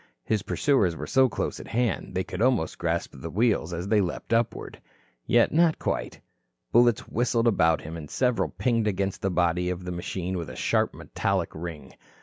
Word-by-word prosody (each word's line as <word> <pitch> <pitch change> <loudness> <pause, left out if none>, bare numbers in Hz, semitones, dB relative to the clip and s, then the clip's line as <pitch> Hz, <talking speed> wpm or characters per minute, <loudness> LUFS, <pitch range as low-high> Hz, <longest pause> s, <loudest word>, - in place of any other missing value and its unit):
His 110 -2 +1
pursuers 105 - +1
were - - -5
so 130 -1 +4
close - - -3
at - - -9
hand 115 -6 -1
they 95 - +1
could 90 - -6
almost 120 -9 +1
grasp - - -1
the - - -7
wheels, 105 -6 +1
as 85 +2 -4
they 105 0 +3
leaped 90 +5 -3
upward. 115 0 -1 0.5
Yet 120 -1 +4
not 165 0 +3
quite. - - -3 0.5
Bullets 120 -1 +4
whistled 120 0 +1
about 80 -7 +3
him, 80 +2 -7
and 75 -3 -8
several 125 -2 +1
pinged 115 -4 0
against 100 -1 -1
the 95 - 0
body 90 0 +1
of 90 0 -4
the 90 - -4
machine 90 +1 -3
with 85 - -5
a - - -8
sharp - - +1
metallic - - -2
ring. 80 -2 -7
100 Hz, 185 wpm, -26 LUFS, 85-120 Hz, 0.5 s, so